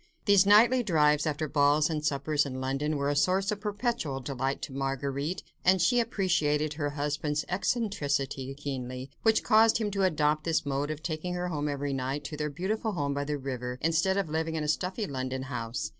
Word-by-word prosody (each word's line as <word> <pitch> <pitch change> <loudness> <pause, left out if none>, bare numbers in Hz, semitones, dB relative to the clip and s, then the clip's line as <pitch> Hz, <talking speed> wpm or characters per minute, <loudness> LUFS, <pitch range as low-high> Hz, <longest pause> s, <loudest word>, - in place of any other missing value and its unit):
These 200 -2 +5
nightly 235 +5 +6
drives 150 -6 +3
after 155 +1 -1
balls 145 +1 +3
and 155 -2 -3
suppers 145 +1 +1
in 130 -2 -5
London 135 +3 -1
were 140 0 0
a - - -1
source 190 +6 +2
of 205 -1 -4
perpetual 210 - -2
delight 135 +1 -2
to 135 - -5
Marguerite, 135 +4 -2 0.2
and 185 +1 +4
she 210 +8 +3
appreciated 170 -10 +1
her 145 -1 -2
husband's 145 +1 -2
eccentricity 145 - -1
keenly, 130 -2 -5
which 220 -1 +3
caused 220 +1 +5
him 215 -2 -2
to 195 0 -1
adopt 155 -4 +2
this 165 -2 0
mode 140 +1 -1
of 155 0 -5
taking 170 +2 -3
her 180 0 -2
home 150 -3 -2
every 140 0 -2
night, 135 +2 -2
to 150 +2 -6
their 150 0 -2
beautiful 205 +8 -2
home 145 -5 -1
by 140 0 -2
the 150 0 -2
river, 125 -2 -4
instead 170 +5 +1
of 195 -3 0
living 160 +1 -2
in 155 - -1
a - - -2
stuffy 185 +7 -1
London 130 -4 -4
house. 115 -3 -4
150 Hz, 195 wpm, -29 LUFS, 140-185 Hz, 0.2 s, nightly